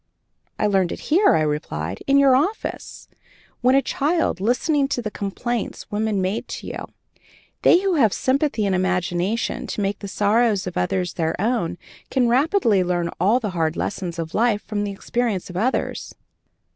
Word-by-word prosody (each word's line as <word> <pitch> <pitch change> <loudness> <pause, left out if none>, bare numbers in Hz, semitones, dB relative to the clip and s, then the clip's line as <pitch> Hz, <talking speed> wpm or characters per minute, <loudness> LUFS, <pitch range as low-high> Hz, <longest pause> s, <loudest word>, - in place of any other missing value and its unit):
"I - - 0
learned 195 -4 +2
it - - -5
here," 395 +5 +5
I 160 - +2
replied, 95 - -3
"in 275 0 +4
your 275 -2 +6
office, 350 +12 -2 0.5
when 255 +2 +4
a 275 - +4
child, 300 - 0
listening 275 +6 +1
to 275 - -2
the 220 -3 -4
complaints 220 +4 -4
women 210 -2 0
made 190 +4 -2
to - - -7
you. - - -6 0.7
They 350 - +5
who 390 -1 +1
have 225 -8 +4
sympathy 265 -3 0
and 195 - +1
imagination 185 +3 -1
to - - -4
make 200 0 -1
the 200 - -6
sorrows 210 +1 +2
of 180 - -5
others 175 - -1
their 160 -1 -2
own 215 -5 0 0.3
can 255 -3 +2
readily 250 - +3
learn 175 -1 -1
all 205 +8 +3
the 215 -5 -3
hard 165 -2 0
lessons 180 -4 -3
of 165 -1 -5
life 225 -2 +1
from 205 -1 -2
the 200 - -3
experience 205 -2 -2
of - - -12
others." 240 +7 -1
210 Hz, 170 wpm, -22 LUFS, 185-250 Hz, 0.7 s, your